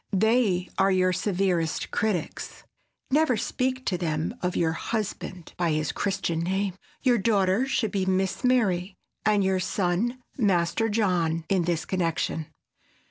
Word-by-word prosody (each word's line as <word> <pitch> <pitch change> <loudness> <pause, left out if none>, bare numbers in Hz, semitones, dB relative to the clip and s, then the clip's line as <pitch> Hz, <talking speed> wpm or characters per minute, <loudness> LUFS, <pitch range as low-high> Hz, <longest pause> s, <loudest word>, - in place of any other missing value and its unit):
They 215 -4 +2
are 195 0 +5
your 185 -1 +3
severest 180 -4 0
critics. 205 -7 -2 0.5
Never 295 -4 +3
speak 255 +4 -1
to 180 -2 0
them 160 +1 -1
of 180 0 -1
your 165 -1 +2
husband 185 -2 -4
by 170 -3 +1
his 155 -1 0
Christian 195 -4 -1
name. 190 +3 -1 0.3
Your 245 -3 +4
daughter 200 +3 +2
should 220 -5 0
be 190 -2 -1
"Miss 190 +3 0
Mary" 200 -7 +2 0.3
and 210 -2 +4
your 190 -1 +2
son 190 +7 0 0.2
"Master 200 +1 +2
John" 175 -7 +1
in 185 -3 +2
this 170 -2 -1
connection. 165 -3 -1
190 Hz, 135 wpm, -26 LUFS, 175-215 Hz, 0.5 s, are